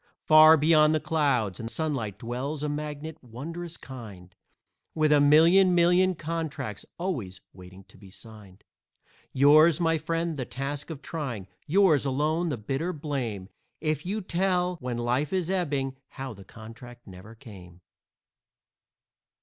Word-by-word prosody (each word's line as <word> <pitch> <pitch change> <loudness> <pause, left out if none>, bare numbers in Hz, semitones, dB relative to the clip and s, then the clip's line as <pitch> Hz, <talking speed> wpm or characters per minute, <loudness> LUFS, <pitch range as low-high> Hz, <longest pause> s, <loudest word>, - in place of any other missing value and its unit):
Far 155 +1 +7
beyond 155 0 +4
the - - +1
clouds 140 - 0
and 115 - -5
sunlight 130 -10 -3
dwells 130 +6 -5
a 150 - -1
magnate 150 +1 -6
wondrous 165 +8 -8
kind, 105 -9 -11 0.6
With 155 -1 +2
a 150 - +5
million, 170 +6 +5
million 180 +2 +3
contracts 155 - -5
always 125 - -4
waiting 95 +1 -14
to 95 - -21
be 100 - -14
signed. 105 -2 -14 0.7
Yours, 155 +4 +5
my 165 -2 +1
friend, 165 +1 -2
the 130 - -2
task 140 +4 -5
of 150 -3 -8
trying; 130 - -5 0.2
yours 170 -4 +4
alone 155 +5 0
the 145 - -3
bitter 135 +11 -3
blame, 130 - -4 0.3
If 155 -1 -2
you 205 +4 -3
tell, 180 -1 0
when 125 -4 -5
life 125 +5 -1
is 185 -2 -1
ebbing, 140 -8 -1
how 135 -2 -7
the 100 -2 -14
contract 115 +3 -13
never 95 +3 -13
came. 90 -6 -14
145 Hz, 140 wpm, -26 LUFS, 115-165 Hz, 0.7 s, Far